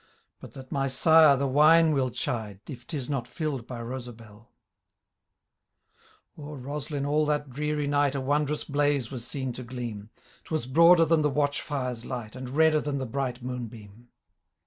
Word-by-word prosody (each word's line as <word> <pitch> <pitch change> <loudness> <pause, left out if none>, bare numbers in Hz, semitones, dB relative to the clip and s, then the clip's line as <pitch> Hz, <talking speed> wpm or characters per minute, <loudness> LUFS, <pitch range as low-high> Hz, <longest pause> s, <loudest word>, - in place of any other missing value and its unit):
But - - -12
that 130 -1 -11
my 135 -1 0
sire 155 +1 +6
the 140 - 0
wine 155 +4 +5
will 130 -3 +1
chide,. 110 -5 -4
If 125 -4 -9
tis 140 -7 -4
not 135 -5 -2
fiU'd 135 -1 -4
by 125 -2 -6
RoeabeUe."— 115 -3 -9 1.9
O^er 145 -3 -8
Roslin 145 0 -4
all 150 +1 +1
that 145 -2 -1
dreary 150 +2 -2
night, 145 -1 +1
A - - -1
wondrous 145 +2 0
blaze 145 -3 0
was 120 -3 -6
seen 130 -2 -4
to 125 - -7
gleam; 120 -4 -7 0.3
Twas 155 -7 -3
broader 165 +5 +6
than 160 0 +3
the 150 - +2
watch 145 0 0
fires 125 -5 -4
light. 120 -3 -6
And 130 -1 -7
redder 155 +2 +3
than 145 -1 -3
the 135 - -3
bright 125 0 -3
moon 125 -1 -4
beom. 110 +1 -14
135 Hz, 170 wpm, -27 LUFS, 125-150 Hz, 1.9 s, sire